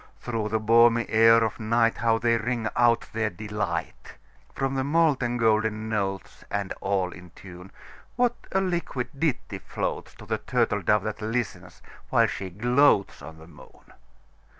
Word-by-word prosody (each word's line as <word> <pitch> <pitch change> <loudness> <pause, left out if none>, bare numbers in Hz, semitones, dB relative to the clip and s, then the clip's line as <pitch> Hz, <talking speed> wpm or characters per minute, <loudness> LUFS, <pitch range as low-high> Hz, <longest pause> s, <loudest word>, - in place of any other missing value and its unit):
Through 115 -3 -3
the 110 - +1
balmy 115 +1 +4
air 115 +1 +5
of 110 - -2
nightHow 115 0 +1
they 115 0 +2
ring 115 0 -2
out 120 -1 +3
their 110 -1 0
delight! 105 +2 -5 0.4
From 135 0 -2
the 135 -1 -1
molten 140 -5 +1
golden 110 -1 +1
notes, 95 -3 -3
And 100 -2 -3
all 95 -2 -1
in 90 -1 -12
tune, 90 0 -12 0.4
What 245 -1 +2 0.2
a 190 - +1
liquid 170 -9 -2
ditty 155 -5 -2
floatsTo - - -5
the - - -1
turtle - - 0
dove 105 -2 +2
that 110 0 -5
listens, 105 -6 -4 0.3
while - - +4
she 95 - -4
gloatsOn 105 - +1
the 80 - -14
moon! 80 -3 -18
115 Hz, 145 wpm, -25 LUFS, 100-120 Hz, 0.4 s, air